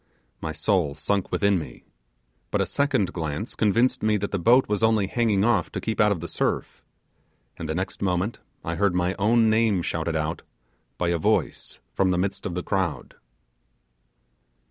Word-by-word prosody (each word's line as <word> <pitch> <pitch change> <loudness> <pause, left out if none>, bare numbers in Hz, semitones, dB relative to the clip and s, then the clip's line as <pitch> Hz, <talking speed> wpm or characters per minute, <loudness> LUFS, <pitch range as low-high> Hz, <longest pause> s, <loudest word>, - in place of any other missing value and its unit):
My 80 - -3
soul 80 -2 0
sunk 100 +4 -1
within 100 -2 +2
me: 65 -7 -9 0.7
but - - 0
a - - +2
second 140 -9 0
glance 80 +6 -4
convinced 115 +4 +2
me 110 0 +2
that 100 0 -3
the 100 - -1
boat 120 +9 +4
was 105 0 -1
only 110 -3 +3
hanging 105 -1 +1
off 110 -8 +1
to - - -2
keep 110 -1 -1
out 105 0 +4
of 90 -6 -1
the 85 - -5
surf; - - -2 0.7
and 80 - -6
the 80 - -1
next 95 +2 -4
moment 95 +3 -1 0.2
I 85 +1 -3
heard 100 -3 +2
my 90 +1 +1
own 110 +2 +4
name 110 -5 +2
shouted 80 0 -2
out 80 +1 -2 0.6
by 90 - 0
a 85 -1 0
voice - - -1
from 95 - +2
the 90 - +1
midst 95 +2 -2
of 85 - -5
the 90 - -3
crowd. 95 -5 -2
95 Hz, 180 wpm, -25 LUFS, 85-110 Hz, 0.7 s, boat